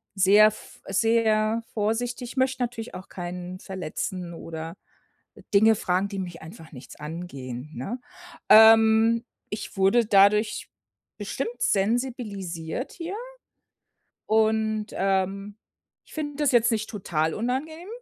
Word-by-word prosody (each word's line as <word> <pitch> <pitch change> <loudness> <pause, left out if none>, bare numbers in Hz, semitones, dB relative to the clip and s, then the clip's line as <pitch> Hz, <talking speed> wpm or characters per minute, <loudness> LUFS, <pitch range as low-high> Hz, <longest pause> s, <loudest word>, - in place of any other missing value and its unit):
sehr 205 +3 +6
v 215 - -14
sehr 220 +1 +2
vorsichtig, 240 +4 -2
möchte 260 -1 +1
natürlich 230 -4 -5
auch 185 +1 -10
keinen 180 0 -6
verletzen 185 0 -5
oder 165 +1 -7 0.8
Dinge 220 +2 +6
fragen, 185 0 0
die 195 - -5
mich 175 -2 -6
einfach 160 0 -12
nichts 130 -3 -12
angehen, 150 -4 -7
ne? 200 - -5 0.5
Ähm, 225 +1 +7 0.2
ich 210 - -6
wurde 195 +5 +4
dadurch 210 +1 +3 0.5
bestimmt 480 +2 -5
sensibilisiert 205 - -2
hier. 345 +2 -6 1.1
Und, 220 0 +1
ähm, 195 +1 -1 0.5
ich - - -18
finde 295 -2 -4
das 295 -2 +2
jetzt 240 -1 +4
nicht 220 -1 -2
total 160 -7 -1
unangenehm. 295 - -3
210 Hz, 115 wpm, -25 LUFS, 185-230 Hz, 1.1 s, Ähm